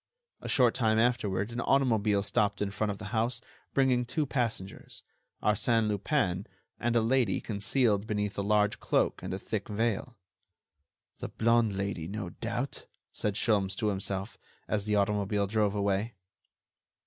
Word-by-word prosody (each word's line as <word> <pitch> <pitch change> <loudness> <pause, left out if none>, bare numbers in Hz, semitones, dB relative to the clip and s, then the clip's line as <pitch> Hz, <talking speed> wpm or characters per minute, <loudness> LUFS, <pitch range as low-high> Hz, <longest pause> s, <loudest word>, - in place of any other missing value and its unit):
A - - -6
short 125 -3 +4
time 110 -3 +2
afterward 110 -4 +1
an 120 0 -3
automobile 110 -7 +2
stopped 100 0 +1
in 100 -1 -1
front 105 +1 -1
of 100 - -3
the 105 -1 -7
house, 115 +2 +1 0.4
bringing 130 -2 +3
two 145 +5 -1
passengers: 115 -8 -3 0.4
Arsène 110 +1 +2
Lupin 100 - 0 0.3
and 120 0 0
a 115 - +5
lady 115 -3 +2
concealed 105 0 +1
beneath 105 -2 -1
a - - -1
large 105 0 +2
cloak - - +1
and - - -5
a 95 - -2
thick 100 +1 -4
veil. 115 +2 -1 1.0
"The - - -5
blonde 115 -3 +2
Lady, 100 -5 -3
no 100 -1 -4
doubt," - - -4 0.3
said 105 -2 -2
Sholmes 100 -3 +1
to 110 -3 0
himself, 95 +1 -3 0.3
as 105 -2 -1
the 105 -1 +1
automobile 100 0 +1
drove 105 0 +1
away. 100 +2 0
105 Hz, 150 wpm, -30 LUFS, 100-115 Hz, 1.0 s, a